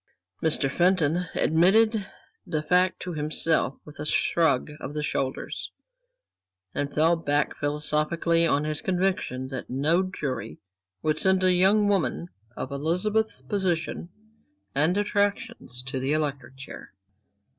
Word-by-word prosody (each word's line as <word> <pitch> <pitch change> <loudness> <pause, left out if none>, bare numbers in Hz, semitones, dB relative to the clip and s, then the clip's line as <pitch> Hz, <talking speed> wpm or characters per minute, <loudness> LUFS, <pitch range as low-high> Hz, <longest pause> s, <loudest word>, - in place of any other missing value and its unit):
Mr. 155 -3 +1
Fenton 175 +2 +2
admitted 200 +6 +3 0.4
the 155 -3 -3
fact 180 +4 +2
to 180 - -5
himself 155 -2 0
with 150 - -12
a 150 - -4
shrug 150 -3 +1
of 145 +1 -7
the 150 - -2
shoulders, 135 -2 -3 1.0
and 145 0 -2
fell 160 +3 +3
back 145 -3 0
philosophically 150 +3 +1
on 145 -2 +2
his 150 -1 -2
conviction 180 -8 -1
that 130 -2 -6
no 150 +7 +2
jury 140 - -4 0.5
would 155 0 +1
send 190 -1 +3
a 185 0 +4
young 200 +4 +4
woman 185 -3 0 0.3
of 130 - -5
Elizabeth's 180 +10 -1
position 175 -4 -2 0.6
and 155 +7 +2
attractions 205 - -1
to 135 0 -4
the 135 +3 0
electric 140 -4 -3
chair. 135 -7 -10
160 Hz, 125 wpm, -26 LUFS, 145-185 Hz, 1.0 s, a